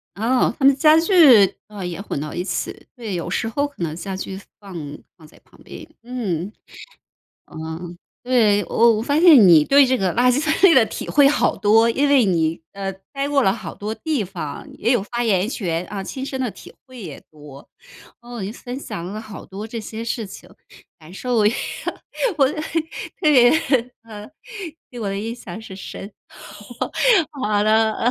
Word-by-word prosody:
哦， 235 +5 +1
他 270 - +1
们 275 0 +6
家 305 +2 +5
具， 300 - +6
哦， 205 -2 -8
也 180 0 -5
混 200 - -4
到 150 0 -6
一 175 - -2
起， 190 - -5
对， 225 -6 -5
有 170 0 -4
时 220 - -1
候 285 +5 -1
可 285 -9 -15
能 160 -2 -2
家 190 +3 -6
具 190 0 -6 0.2
放 195 -3 -12 0.4
放 160 - -17
在 - - -21
旁 - - -24
边， - - -11 0.2
嗯， 205 -7 -4 0.9
呃， - - -16 0.7
对， 220 -5 +3
我 230 -1 +3
我 - - -2
发 285 +6 +1
现 340 -2 +8
你 160 -4 +7
对 280 +1 +6
这 260 -1 +2
个 190 -5 0
垃 250 +2 +4
圾 255 - +1
分 310 +1 +1
类 380 -4 +7
的 250 -4 +6
体 - - -7
会 285 -1 +5
好 295 - +2
多， 225 +2 +4
因 275 +5 +1
为 280 -3 +5
你， 165 -4 0
呃， 195 -1 -4 0.2
待 275 0 -2
过 285 -1 +2
了 190 - +3
好 195 -6 -6
多 215 +2 -5
地 305 -6 -2
方， 175 -6 -7
也 230 - +1
有 240 - +1
发 240 +4 -3
言 205 -2 +1
权 175 -8 -2
啊， 200 -1 -5
亲 260 +7 -6
身 265 -1 -5
的 250 -4 -2
体 - - -14
会 255 -3 -12
也 160 -8 -8
多， 145 -2 -14 0.5
哦， 240 0 -9
您 200 +3 -5
分 250 +1 -7
享 170 - -7
了 205 +3 -6
好 215 -2 -10
多 200 +3 -7
这 230 +1 -6
些 220 +2 -7
事 230 -2 -3
情， 200 - -12 0.5
感 155 +2 -15
受 245 +5 -3
我 210 - +4 1.7
对， 260 -6 +6 0.5
啊， 215 -1 -10 0.6
给 245 - -8
我 205 - -3
的 195 - -3
印 225 +3 -4
象 235 -2 -9
是 220 -4 -10
深 195 +1 -9 1.2
好 210 -8 -1
了。 220 +1 +2
220 Hz, 200 characters per minute, -21 LUFS, 195-255 Hz, 1.7 s, 现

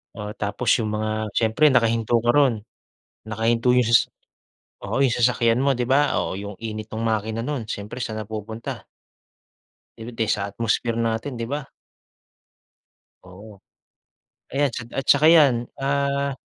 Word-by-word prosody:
Oo, 105 -1 -6
tapos 105 +4 -2
yung 110 -2 -2
mga 110 0 -2
siyempre 115 +7 +3
nakahinto 115 -3 +2
ka 120 - +1
ro'n. 125 -6 +2 0.6
Nakahinto 115 +2 +1
yung 125 -2 +3
sas 115 - +4 0.7
oo, - - -2
yung 130 -3 +3
sasakyan 120 0 +2
mo, 140 0 +3
di 125 - -1
ba, 145 +2 +3
oh - - -3
yung 100 +1 -6
init 110 -1 -6
nung 110 +1 -4
makina 110 0 -1
nun, 140 -5 -3
syempre 105 +3 -6
saan 110 -2 -4
napupunta? 110 +1 -6 1.2
Eh 115 - -8
di 115 -1 -2
sa 100 -2 0
atmosphere 115 +3 -1
natin, 115 +3 -2
di 115 0 -5
ba? 145 0 -3 1.6
Oo. 100 +3 -13 0.9
Ayan 140 +1 +1
tsa - - -4 0.2
at 135 - -1
'tsaka 145 +2 +5
'yan, 135 -8 +5
ah 140 0 0
115 Hz, 145 wpm, -23 LUFS, 110-130 Hz, 1.6 s, tsaka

